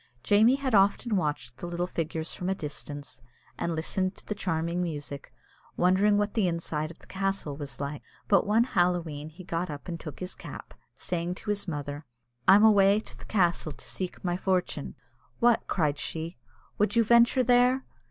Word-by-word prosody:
Jamie 220 Hz, +5 st, +5 dB
had 275 Hz, -3 st, -2 dB
often 205 Hz, +3 st, +3 dB
watched 145 Hz, -8 st, -2 dB
the 175 Hz, -, -6 dB
little 175 Hz, 0 st, -2 dB
figures 165 Hz, -2 st, -3 dB
from 180 Hz, -, -3 dB
a 190 Hz, -, +1 dB
distance, 145 Hz, -5 st, -8 dB, 0.4 s
and 170 Hz, -1 st, -1 dB
listened 185 Hz, +4 st, -1 dB
to -, -, -15 dB
the -, -, -2 dB
charming 170 Hz, -2 st, -1 dB
music, 145 Hz, -4 st, -5 dB, 0.5 s
wondering 190 Hz, +4 st, +4 dB
what 205 Hz, 0 st, 0 dB
the 215 Hz, -5 st, +2 dB
inside 165 Hz, -3 st, -2 dB
of 165 Hz, -, -12 dB
the -, -, -19 dB
castle 195 Hz, -6 st, -2 dB
was 140 Hz, -2 st, -8 dB
like; 140 Hz, +1 st, -4 dB, 0.3 s
but 200 Hz, -2 st, +4 dB
one 220 Hz, +3 st, +4 dB
Halloween 175 Hz, -, 0 dB
he 165 Hz, +4 st, -12 dB
got 170 Hz, 0 st, -2 dB
up 145 Hz, +2 st, -7 dB
and 170 Hz, -2 st, -4 dB
took 155 Hz, -3 st, -8 dB
his 185 Hz, 0 st, -5 dB
cap, -, -, -10 dB, 0.2 s
saying 175 Hz, 0 st, -3 dB
to 210 Hz, -, -3 dB
his 205 Hz, -1 st, -2 dB
mother, 145 Hz, -2 st, -4 dB, 0.4 s
"I'm 205 Hz, +3 st, +8 dB
awa' 200 Hz, -1 st, +6 dB
to -, -, -12 dB
the -, -, -12 dB
castle 175 Hz, -6 st, +1 dB
to -, -, -11 dB
seek 185 Hz, -2 st, -5 dB
my 175 Hz, -1 st, 0 dB
fortune." 185 Hz, -1 st, -1 dB, 0.4 s
"What!" 235 Hz, -1 st, +3 dB
cried 150 Hz, -5 st, 0 dB
she, 165 Hz, +2 st, -4 dB, 0.4 s
"would 210 Hz, +3 st, +2 dB
you 230 Hz, -, +5 dB
venture 235 Hz, +3 st, +5 dB
there? 250 Hz, +2 st, +4 dB
180 Hz, 180 wpm, -28 LUFS, 160-205 Hz, 0.5 s, I'm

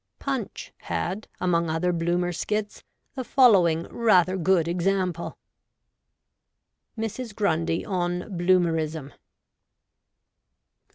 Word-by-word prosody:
Punch -, -, -4 dB
had, 175 Hz, -, -4 dB
among 170 Hz, -2 st, +1 dB
other 170 Hz, +3 st, 0 dB
Bloomer 175 Hz, +1 st, 0 dB
skits, 210 Hz, +4 st, -3 dB, 0.3 s
the 260 Hz, -, -4 dB
following 190 Hz, -, +4 dB
rather 185 Hz, -6 st, +3 dB
good 180 Hz, -2 st, +2 dB
example: 180 Hz, 0 st, -1 dB, 0.8 s
— -, -, -54 dB
MRS. 225 Hz, 0 st, -4 dB
GRUNDY 165 Hz, -5 st, 0 dB
ON 180 Hz, +1 st, -2 dB
BLOOMERISM. 165 Hz, -5 st, +1 dB
180 Hz, 90 wpm, -25 LUFS, 170-195 Hz, 0.8 s, following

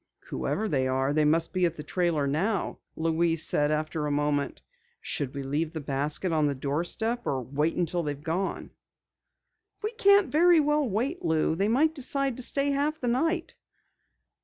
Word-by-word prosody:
"Whoever 220 Hz, -, -2 dB
they 130 Hz, -8 st, +1 dB
are, 135 Hz, +2 st, 0 dB
they 155 Hz, 0 st, +3 dB
must 165 Hz, +2 st, +2 dB
be 185 Hz, -1 st, 0 dB
at 170 Hz, -, -5 dB
the 150 Hz, -, -6 dB
trailer 165 Hz, -2 st, 0 dB
now," 175 Hz, +9 st, -1 dB, 0.2 s
Louise 165 Hz, 0 st, +1 dB
said 145 Hz, 0 st, +3 dB
after 155 Hz, 0 st, -1 dB
a -, -, -1 dB
moment. 145 Hz, 0 st, -1 dB, 0.4 s
"Should 140 Hz, -1 st, -3 dB
we 140 Hz, -, -4 dB
leave 150 Hz, +4 st, -2 dB
the 160 Hz, -, -4 dB
basket 145 Hz, +5 st, -2 dB
on 155 Hz, -2 st, +2 dB
the 140 Hz, -, -1 dB
doorstep 175 Hz, -, -2 dB
or 130 Hz, -2 st, -1 dB
wait 150 Hz, +6 st, -1 dB
until 175 Hz, 0 st, 0 dB
they've 145 Hz, -3 st, -4 dB
gone?" 180 Hz, +4 st, -3 dB, 1.1 s
"We 430 Hz, -, -1 dB
can't 400 Hz, -, +4 dB
very 340 Hz, +2 st, +5 dB
well 295 Hz, -2 st, +2 dB
wait, 265 Hz, -, -2 dB
Lou. 160 Hz, 0 st, +1 dB
They 195 Hz, +4 st, +1 dB
might 290 Hz, +8 st, +3 dB
decide 275 Hz, -2 st, -1 dB
to -, -, -5 dB
stay 280 Hz, +3 st, 0 dB
half 290 Hz, +3 st, 0 dB
the 245 Hz, -, -1 dB
night." 325 Hz, +7 st, 0 dB
165 Hz, 175 wpm, -27 LUFS, -, 1.1 s, very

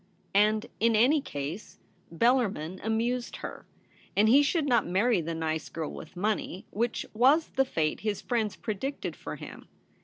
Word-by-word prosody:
And, 215 Hz, +2 st, +3 dB
in 230 Hz, 0 st, +3 dB
any 265 Hz, +8 st, +4 dB
case, 145 Hz, -, -6 dB, 0.3 s
Bellarmin 190 Hz, -4 st, +1 dB
amused 235 Hz, +3 st, -1 dB
her; -, -, -8 dB, 0.5 s
and 210 Hz, +2 st, +5 dB
he 265 Hz, +6 st, +7 dB
should 295 Hz, +2 st, +1 dB
not 240 Hz, -5 st, +2 dB
marry 195 Hz, +3 st, +2 dB
the 165 Hz, +1 st, -4 dB
nice 160 Hz, -1 st, -2 dB
girl 160 Hz, -2 st, -4 dB
with 160 Hz, -, -10 dB
money, 195 Hz, -1 st, -2 dB
which 230 Hz, +2 st, -1 dB
was 270 Hz, +8 st, +4 dB
the 270 Hz, 0 st, +1 dB
fate 155 Hz, -11 st, -1 dB
his 210 Hz, -1 st, -2 dB
friends 225 Hz, -4 st, -1 dB
predicted 245 Hz, +7 st, -4 dB
for -, -, -7 dB
him. -, -, -10 dB
215 Hz, 155 wpm, -29 LUFS, 180-245 Hz, 0.5 s, he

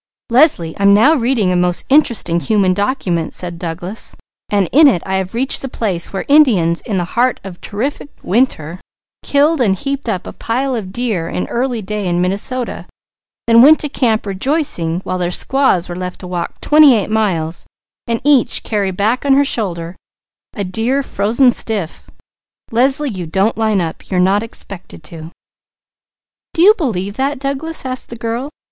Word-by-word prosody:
"Leslie, 235 Hz, -, +3 dB
I'm 200 Hz, 0 st, +5 dB
now 265 Hz, +10 st, +5 dB
reading 235 Hz, -8 st, +1 dB
a -, -, +1 dB
most 180 Hz, 0 st, +1 dB
interesting 235 Hz, -, +2 dB
human 195 Hz, -1 st, +1 dB
document," 185 Hz, -6 st, -2 dB
said 175 Hz, -2 st, -4 dB
Douglas, 175 Hz, +5 st, -5 dB, 0.3 s
"and 200 Hz, -3 st, +1 dB
in 300 Hz, +3 st, +7 dB
it 205 Hz, -11 st, +2 dB
I 190 Hz, 0 st, -1 dB
have 190 Hz, +2 st, -4 dB
reached 260 Hz, +3 st, +1 dB
the 270 Hz, -, -5 dB
place 190 Hz, -8 st, -3 dB
where 195 Hz, -, -4 dB
Indians 215 Hz, -, +4 dB
in 210 Hz, -5 st, -3 dB
the 180 Hz, -, 0 dB
heart 245 Hz, +2 st, +1 dB
of 185 Hz, -2 st, -10 dB
terrific 265 Hz, +8 st, -4 dB
winter 180 Hz, -, 0 dB, 0.4 s
killed 290 Hz, +1 st, +2 dB
and 200 Hz, -5 st, +2 dB
heaped 275 Hz, +2 st, -4 dB
up 190 Hz, -4 st, -2 dB
a -, -, -8 dB
pile 260 Hz, +4 st, -2 dB
of 210 Hz, -6 st, -4 dB
deer 215 Hz, -8 st, -2 dB
in 180 Hz, -, -3 dB
early 240 Hz, -2 st, -2 dB
day 210 Hz, 0 st, -3 dB
in 175 Hz, 0 st, 0 dB
Minnesota, 205 Hz, +7 st, -2 dB, 0.6 s
then 230 Hz, 0 st, +6 dB
went 305 Hz, +5 st, +7 dB
to 295 Hz, -, -3 dB
camp 225 Hz, -6 st, 0 dB
rejoicing, 195 Hz, -, -1 dB
while 185 Hz, -1 st, -4 dB
their 175 Hz, -1 st, -1 dB
squaws 230 Hz, -2 st, +1 dB
were 175 Hz, -, -6 dB
left 180 Hz, 0 st, -6 dB
to 180 Hz, -, -8 dB
walk 175 Hz, -1 st, -5 dB
twenty 300 Hz, -4 st, +6 dB
eight 215 Hz, -1 st, -2 dB
miles 175 Hz, -7 st, -1 dB, 0.4 s
and 230 Hz, -1 st, -1 dB
each 285 Hz, -3 st, +2 dB
carry 205 Hz, -3 st, -1 dB
back 205 Hz, +7 st, 0 dB
on 275 Hz, -1 st, +4 dB
her 280 Hz, +1 st, +4 dB
shoulder 175 Hz, -8 st, -3 dB, 0.6 s
a 200 Hz, -, -3 dB
deer 230 Hz, +9 st, -1 dB
frozen 235 Hz, +4 st, +2 dB
stiff. 205 Hz, -8 st, -3 dB, 0.6 s
Leslie, 265 Hz, +5 st, +2 dB
you 180 Hz, -4 st, -6 dB
don't 195 Hz, +7 st, +1 dB
line 220 Hz, -2 st, +1 dB
up! 165 Hz, -2 st, -5 dB
You 185 Hz, -, -1 dB
are -, -, +3 dB
not 190 Hz, +3 st, +3 dB
expected 195 Hz, -7 st, -11 dB
to." 160 Hz, 0 st, -9 dB, 1.3 s
"Do 335 Hz, -, +3 dB
you 415 Hz, +3 st, +8 dB
believe 205 Hz, -, -3 dB
that, 275 Hz, +2 st, -1 dB
Douglas?" 280 Hz, +4 st, -3 dB
asked 255 Hz, 0 st, -4 dB
the 235 Hz, -, -7 dB
girl. 235 Hz, +4 st, -4 dB
215 Hz, 175 wpm, -16 LUFS, 180-260 Hz, 1.3 s, you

